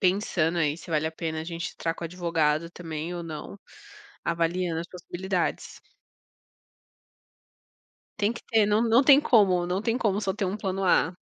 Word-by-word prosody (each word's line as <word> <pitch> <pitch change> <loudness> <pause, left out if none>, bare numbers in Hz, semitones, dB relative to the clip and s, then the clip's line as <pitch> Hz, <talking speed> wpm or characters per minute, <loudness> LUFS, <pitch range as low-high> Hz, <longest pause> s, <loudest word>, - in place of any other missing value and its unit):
pensando 180 -3 +1
aí, 150 -2 +1
se 170 - -12
vale 155 0 +1
a 160 - -10
pena 160 -1 -4
a - - -5
gente 170 +1 -5
entrar 165 - -2
com 170 - -7
o - - -1
advogado 165 -2 0
também 165 -1 -6
ou 175 - -4
não, 160 +4 -7 0.7
avaliando 170 0 0
as 170 - -6
possibilidades. 180 0 -3 2.4
Tem 210 +2 +1
que 235 - -9
ter, 220 -2 +3
não 210 +2 +2
não 235 +2 +5
tem 280 0 +8
como, 190 -9 +4
não 185 +3 -1
tem 230 +1 0
como 205 -4 +1
só 190 -2 -1
ter 200 0 -2
um 190 +2 -2
plano 195 -1 -2
A. 180 -2 +3
175 Hz, 175 wpm, -26 LUFS, 165-195 Hz, 2.4 s, tem